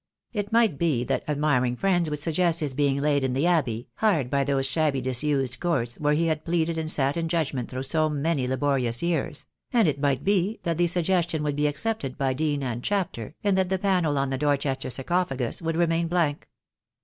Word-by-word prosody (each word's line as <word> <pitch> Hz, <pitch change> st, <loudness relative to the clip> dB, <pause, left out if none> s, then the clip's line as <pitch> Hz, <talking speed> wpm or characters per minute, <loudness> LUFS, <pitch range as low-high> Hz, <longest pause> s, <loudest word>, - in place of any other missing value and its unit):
It 205 Hz, -1 st, -3 dB
might 225 Hz, -10 st, +3 dB
be 150 Hz, -8 st, +1 dB
that -, -, -1 dB
admiring 140 Hz, -5 st, +1 dB
friends 175 Hz, +1 st, +1 dB
would 150 Hz, -, -2 dB
suggest 165 Hz, +2 st, +1 dB
his 150 Hz, -5 st, -2 dB
being 140 Hz, 0 st, +1 dB
laid 145 Hz, -1 st, +1 dB
in 130 Hz, -1 st, 0 dB
the 135 Hz, +5 st, +1 dB
Abbey, 130 Hz, -10 st, +1 dB
hard 165 Hz, -, +1 dB
by 140 Hz, -1 st, +2 dB
those 135 Hz, -1 st, 0 dB
shabby 140 Hz, 0 st, +1 dB
disused 130 Hz, 0 st, 0 dB
courts 125 Hz, -9 st, -1 dB
where 150 Hz, 0 st, +2 dB
he 165 Hz, +2 st, +1 dB
had 155 Hz, -2 st, -1 dB
pleaded 165 Hz, -1 st, 0 dB
and 155 Hz, -1 st, -2 dB
sat 140 Hz, 0 st, +2 dB
in 165 Hz, -1 st, -1 dB
judgment 150 Hz, -7 st, -1 dB
through 130 Hz, +1 st, -4 dB
so 155 Hz, +3 st, +2 dB
many 145 Hz, -2 st, 0 dB
laborious 130 Hz, -2 st, 0 dB
years; 170 Hz, -1 st, -2 dB, 0.3 s
and 230 Hz, -7 st, +4 dB
it 140 Hz, -2 st, -1 dB
might 140 Hz, -2 st, +1 dB
be 200 Hz, +2 st, +1 dB
that 170 Hz, -1 st, -1 dB
the 175 Hz, -, +4 dB
suggestion 170 Hz, -2 st, +1 dB
would 145 Hz, -1 st, -1 dB
be 150 Hz, +1 st, +1 dB
accepted 145 Hz, -, -2 dB
by 135 Hz, -2 st, 0 dB
Dean 145 Hz, 0 st, -1 dB
and 120 Hz, -2 st, -3 dB
Chapter, 170 Hz, -, -2 dB
and 200 Hz, -2 st, +2 dB
that 185 Hz, -1 st, +1 dB
the 190 Hz, -, +1 dB
panel 180 Hz, -6 st, +1 dB
on 135 Hz, 0 st, 0 dB
the 135 Hz, -, -2 dB
Dorchester 140 Hz, -2 st, 0 dB
sarcophagus 135 Hz, -2 st, -1 dB
would 165 Hz, 0 st, -2 dB
remain 165 Hz, 0 st, +1 dB
blank. 165 Hz, -4 st, -1 dB
150 Hz, 205 wpm, -25 LUFS, 135-170 Hz, 0.3 s, and